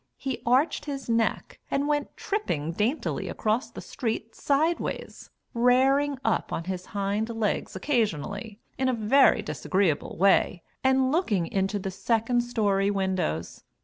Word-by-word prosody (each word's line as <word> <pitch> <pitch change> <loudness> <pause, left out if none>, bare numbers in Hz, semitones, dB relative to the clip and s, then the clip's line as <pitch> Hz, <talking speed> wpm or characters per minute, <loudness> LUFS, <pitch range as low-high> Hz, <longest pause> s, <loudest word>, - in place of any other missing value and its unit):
He 265 -2 -4
arched 260 +7 +2
his 280 -2 -5
neck 230 -1 0
and 280 +1 0
went 295 -1 -1
tripping 165 - -2
daintily 220 - -1
across 220 +4 -1
the - - -9
street 225 -2 -4
sideways, 310 +4 -1 0.2
"rairing 265 +4 +3
up" - - 0
on 165 - -2
his 185 0 -5
hind 200 +3 -1
legs 225 -5 -2
occasionally, 205 - -1 0.2
in 260 0 +2
a 255 - +1
very 225 +1 +4
disagreeable 190 -6 -1
way, 190 -1 +3 0.2
and 265 0 +3
looking 230 - +1
into 195 +3 -1
the 195 -1 -4
second 230 +5 +1
story 205 -5 +1
windows. 190 - -2
225 Hz, 135 wpm, -27 LUFS, 195-265 Hz, 0.2 s, very